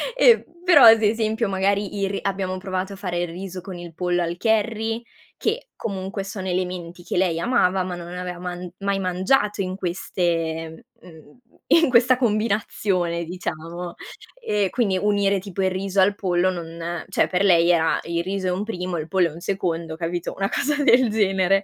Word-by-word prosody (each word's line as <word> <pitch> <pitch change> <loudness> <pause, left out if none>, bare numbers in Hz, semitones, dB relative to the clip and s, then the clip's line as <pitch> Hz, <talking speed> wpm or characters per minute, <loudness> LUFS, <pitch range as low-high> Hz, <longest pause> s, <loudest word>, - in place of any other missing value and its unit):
e - - +5 0.2
però 350 -6 +7
ad 225 -1 +9
esempio 220 0 +1
magari 200 +1 0
il 195 - +1
ri 195 - -2
abbiamo 190 -1 -2
provato 185 +1 -3
a - - -7
fare 180 -3 -3
il 175 - -1
riso 185 +2 -7
con 185 -1 -8
il 175 -1 -9
pollo 175 +1 0
al 170 0 -2
curry, 225 +2 0 0.3
che 475 +3 -2
comunque 195 0 -4
sono 195 -1 -6
elementi 180 -1 -3
che 175 - -3
lei 175 -3 +2
amava, 185 -4 +2
ma 180 -1 -4
non 175 -1 -8
aveva 180 -1 -5
man 180 0 -6
mai 200 0 -1
mangiato 195 +3 +1
in 185 0 -3
queste 165 -3 -2 0.2
mhmm, 160 0 -16 0.3
in 330 -3 +5
questa 250 +1 +5
combinazione 205 -6 0
diciamo, 170 0 -6 0.4
e 210 - 0
quindi 200 -6 +1
unire 200 -1 +2
tipo 195 0 -4
il 190 - +2
riso 195 +1 -2
al 200 +2 +3
pollo 185 -2 +1
non 170 -1 -5
cioè, - - +2
per 185 +2 0
lei 170 -3 +5
era: 165 -2 +2
"Il 170 0 -2
riso 190 0 -2
è - - +1
un 185 +3 -2
primo, 180 -5 -4
il 155 - -4
pollo 185 -3 +2
è - - -11
un 165 - -10
secondo." 170 -4 -2
Capito? 170 0 -3
Una 195 0 0
cosa 290 0 0
del 255 -4 +5
genere. 195 -2 +2
185 Hz, 185 wpm, -23 LUFS, 175-205 Hz, 0.4 s, ad